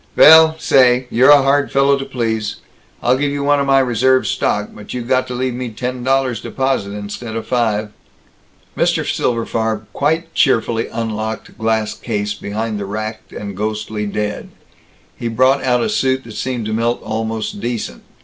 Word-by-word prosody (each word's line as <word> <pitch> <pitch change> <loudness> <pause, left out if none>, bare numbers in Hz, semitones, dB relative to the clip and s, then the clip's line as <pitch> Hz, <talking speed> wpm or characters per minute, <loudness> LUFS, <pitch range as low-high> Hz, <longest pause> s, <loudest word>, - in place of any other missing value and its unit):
"Vell 160 0 +8
say, 125 -4 +4
you're 125 +4 +5
a 145 -2 +8
hard 140 +1 +2
fellow 140 +1 +4
to 135 0 -4
please. 110 -4 -2 0.5
I'll 125 +1 +3
give 145 0 0
you 140 0 -3
one 145 0 +3
of 140 - 0
my 135 0 +4
reserve 130 0 +3
stock, - - -1
but - - -9
you 125 - -3
got 130 +2 +1
to 125 - -5
leave 130 0 -1
me 125 0 -4
ten 125 +3 -5
dollars 130 -3 +1
deposit 130 -8 -1
instead 105 +3 -6
of 115 -1 -4
five." 110 -3 0 0.8
Mr. - - +1
Silberfarb 115 -2 -1
quite 160 +3 -1
cheerfully 115 -4 +2
unlocked 110 -1 -4
a - - -18
glass 110 -1 -1
case 105 -3 -3
behind 105 +1 -4
the 100 - -4
racked 110 +2 -6
and 100 -2 -7
ghostly 105 0 -3
dead; 105 0 -3 0.7
he 120 - -4
brought 130 +4 +2
out 125 -2 +2
a - - 0
suit 130 -11 0
that 115 - -11
seemed 125 -2 -3
to 110 - -3
Milt 115 +2 0
almost 110 -1 -3
decent. 120 0 -4
120 Hz, 175 wpm, -18 LUFS, 110-130 Hz, 0.8 s, Vell